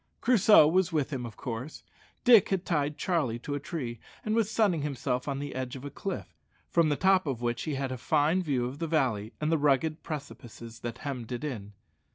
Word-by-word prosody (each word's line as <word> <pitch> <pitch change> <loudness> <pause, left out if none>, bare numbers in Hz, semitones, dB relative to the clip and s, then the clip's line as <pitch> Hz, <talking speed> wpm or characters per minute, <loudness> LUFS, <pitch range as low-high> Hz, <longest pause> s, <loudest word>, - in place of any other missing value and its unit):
Crusoe 210 -9 +6
was 180 +2 +2
with 150 -2 -1
him, 125 -3 -3
of 110 - -12
course. 125 +4 -6 0.4
Dick 235 -6 +7
had 190 -2 -1
tied 150 -3 0
Charlie 155 - 0
to 130 +4 -5
a 145 - -1
tree, 130 - -5 0.3
and 215 - 0
was 225 -2 +2
sunning 205 -8 +2
himself 135 -3 -2
on 140 -1 -1
the 145 0 -5
edge 130 0 -4
of 135 +1 -8
a 145 - -6
cliff, 190 +5 -5 0.4
from 165 -2 +4
the 145 - +2
top 190 0 +3
of 125 -3 -3
which 120 0 -1
he 155 -3 -2
had 135 -1 -2
a 130 - -4
fine 155 +7 +2
view 135 -8 0
of 130 +4 -6
the 165 - -2
valley 120 -9 0
and 155 +1 0
the 165 - +2
rugged 150 +2 +2
precipices 120 -6 -8
that 120 0 -5
hemmed 125 -5 -5
it 120 +2 -4
in. 105 -9 -5
145 Hz, 215 wpm, -29 LUFS, 125-165 Hz, 0.4 s, Dick